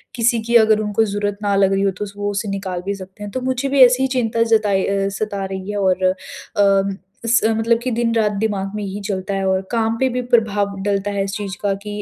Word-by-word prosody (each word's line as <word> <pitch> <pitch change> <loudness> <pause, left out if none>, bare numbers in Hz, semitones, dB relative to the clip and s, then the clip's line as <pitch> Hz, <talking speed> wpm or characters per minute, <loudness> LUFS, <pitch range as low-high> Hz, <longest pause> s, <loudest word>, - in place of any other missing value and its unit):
किसी 235 0 +2
की 235 +1 -1
अगर 215 -1 +3
उनको 210 +1 +1
ज़रूरत 205 0 -2
ना 200 -1 +1
लग 195 -1 +3
रही 195 - +1
हो 195 - +2
तो - - 0
वो 205 0 -2
उसे 205 +1 -3
निकाल 190 -2 -4
भी 200 +1 -2
सकते 190 +2 -11
हैं। 205 - -6
तो 255 - -3
मुझे 260 +1 -1
भी 275 -1 +3
ऐसी 250 +1 +2
ही - - +3
चिंता 230 -1 +1
जताई 210 -4 +2
अ, 195 0 0
सता 200 -2 -2
रही 190 +1 -5
है 205 - -3
और 190 -2 +1 0.5
अ, 195 -1 +3 0.3
स 230 0 +4
मतलब 225 +1 +2
कि 255 - -1
दिन-रात 230 -2 +1
दिमाग 200 -3 -1
में 210 - -3
ये 200 - -4
ही 195 +2 -5
चलता 195 0 -3
है। 195 0 -1
और 190 0 +1
काम 225 -1 +1
पे 265 - +2
भी 250 0 -2
प्रभाव 205 -3 +2
डलता 200 0 0
है 200 -1 -1
इस 195 - -4
चीज़ 200 -3 -5
का 200 -1 +1
कि 210 0 -5
205 Hz, 250 wpm, -20 LUFS, 195-225 Hz, 0.5 s, स